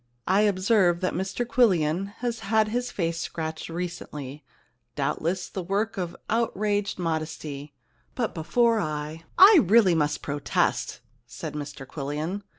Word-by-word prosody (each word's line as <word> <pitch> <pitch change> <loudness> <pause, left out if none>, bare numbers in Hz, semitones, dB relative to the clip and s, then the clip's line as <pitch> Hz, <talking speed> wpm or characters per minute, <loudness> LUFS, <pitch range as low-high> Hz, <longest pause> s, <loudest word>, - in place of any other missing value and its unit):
I 190 +3 +3
observe 190 -3 +3
that 185 - 0
Mr 190 +6 -2
Quillian 190 -7 +2
has 240 -2 -2
had 215 +1 +2
his 245 +2 -1
face 165 -2 -2
scratched 160 -1 -4
recently, 150 -5 -6 0.5
doubtless 175 +2 -1
the 190 - -5
work 200 +5 -1
of 180 -4 -4
outraged 210 -3 0
modesty, 155 -4 -4 0.4
but 235 -4 -1
before 230 +7 +2
I 155 -1 -4
I 385 0 +9
really 200 -1 +5
must 150 -2 0
protest,' 145 0 -1 0.3
said - - -7
Mr 145 -2 -6
Quillian. 150 +8 -4
180 Hz, 130 wpm, -26 LUFS, 155-215 Hz, 0.5 s, I